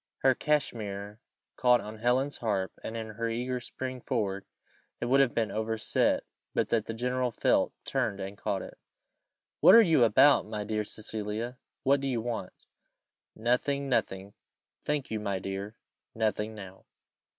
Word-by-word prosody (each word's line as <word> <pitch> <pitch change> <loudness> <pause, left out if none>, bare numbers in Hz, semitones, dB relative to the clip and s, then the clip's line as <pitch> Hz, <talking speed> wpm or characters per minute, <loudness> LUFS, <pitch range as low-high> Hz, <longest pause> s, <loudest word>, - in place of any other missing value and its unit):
Her 135 0 +6
Cachemere 105 -8 -2 0.4
caught 125 -1 +5
on 110 +1 -8
Helen's 130 +5 +1
harp, 100 -5 -1
and, 115 - -4
in 110 - -4
her 115 +2 -3
eager 125 +2 -2
spring 130 +1 -6
forward, 100 -7 -2 0.5
it - - -2
would 130 +3 +4
have 135 -3 +3
been 115 -2 0
overset, 110 0 +1 0.3
but - - +1
that 110 -2 +1
the 115 - -4
general 125 +1 0
felt, 115 - +2
turned, 120 -7 -1
and 95 +1 -5
caught 100 -1 -2
it. - - -11 0.8
"What - - +8
are 230 - +10
you 160 - +4
about, 120 +5 +5
my 105 -1 -4
dear 105 +1 -1
Cecilia? 110 +3 -5 0.2
what 140 +1 +3
do 140 - -2
you 125 -3 0
want?" 115 0 -5 0.7
"Nothing, 135 +5 0
nothing, 100 -5 -1 0.5
thank 145 -4 -2
you, 110 - -1
my 100 -2 -2
dear; 95 +3 -5 0.4
nothing 110 0 -1
now." 95 -2 -11
115 Hz, 155 wpm, -29 LUFS, 105-125 Hz, 0.8 s, are